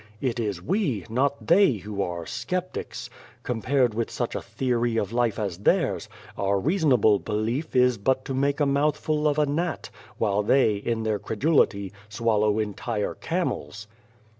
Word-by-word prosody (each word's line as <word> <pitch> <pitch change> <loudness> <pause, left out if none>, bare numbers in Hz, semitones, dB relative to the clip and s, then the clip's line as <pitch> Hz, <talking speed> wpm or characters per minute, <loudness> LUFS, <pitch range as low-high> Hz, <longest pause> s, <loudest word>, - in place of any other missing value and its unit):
It 120 -2 -1
is 100 -6 -2
we, 135 - 0
not 140 +4 0
they, 180 -3 +5
who 105 -1 -5
are 85 -2 -3
4 - - -9
sceptics. 180 - -4 0.4
Compared 125 0 +1
with 115 +1 -2
such - - -3
a - - -3
theory 120 -3 -1
of 105 - 0
The - - -15
Face - - -6
life 120 -3 +1
as 100 -5 -2
theirs, 100 - +1 0.3
our 100 0 +1
reasonable 125 - +3
belief 115 +9 -2
is 125 -3 +4
but 130 +5 +1
to 135 - -3
make 140 +2 +1
a 145 - +3
mouthful 150 +2 +1
of 145 0 +1
a 150 - +4
gnat, 160 +4 -2 0.3
while 105 -2 +1
they, 110 +1 +3
in 115 +2 -2
their 110 -2 0
credulity, 105 - +1 0.2
swallow 105 -1 +1
entire 105 0 -2
camels. 105 +9 -3
115 Hz, 165 wpm, -25 LUFS, 105-140 Hz, 0.4 s, they